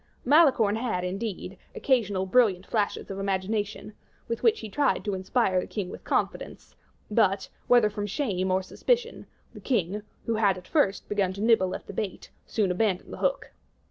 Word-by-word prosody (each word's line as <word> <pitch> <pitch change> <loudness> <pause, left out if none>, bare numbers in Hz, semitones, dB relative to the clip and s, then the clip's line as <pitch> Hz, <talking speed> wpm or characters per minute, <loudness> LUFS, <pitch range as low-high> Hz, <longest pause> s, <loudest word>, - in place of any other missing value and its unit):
Malicorne 255 -8 +5
had, 220 -7 -2
indeed, 195 0 -4 0.2
occasional 205 -8 +1
brilliant 195 -3 +3
flashes 205 -2 -1
of 195 - -5
imagination, 200 +2 -2 0.3
with 230 - -3
which 450 -1 +3
he - - -5
tried 280 +4 0
to 205 - -1
inspire 190 0 +1
the - - -7
king 200 -4 -4
with - - -10
confidence; - - -2 0.4
but, 200 -3 +2 0.2
whether 240 -3 +6
from 205 0 -4
shame 195 -6 -1
or 185 0 +1
suspicion, 485 - -1 0.3
the - - -10
king, 210 -5 0 0.2
who 230 - 0
had 200 -4 +3
at 180 - -12
first 210 -11 +1
begun 200 -3 0
to 200 - -7
nibble 215 -5 +3
at - - -8
the - - -9
bait, 200 -2 -5 0.2
soon 205 -5 0
abandoned 190 0 -1
the - - -6
hook. - - -1
205 Hz, 175 wpm, -27 LUFS, 190-230 Hz, 0.4 s, whether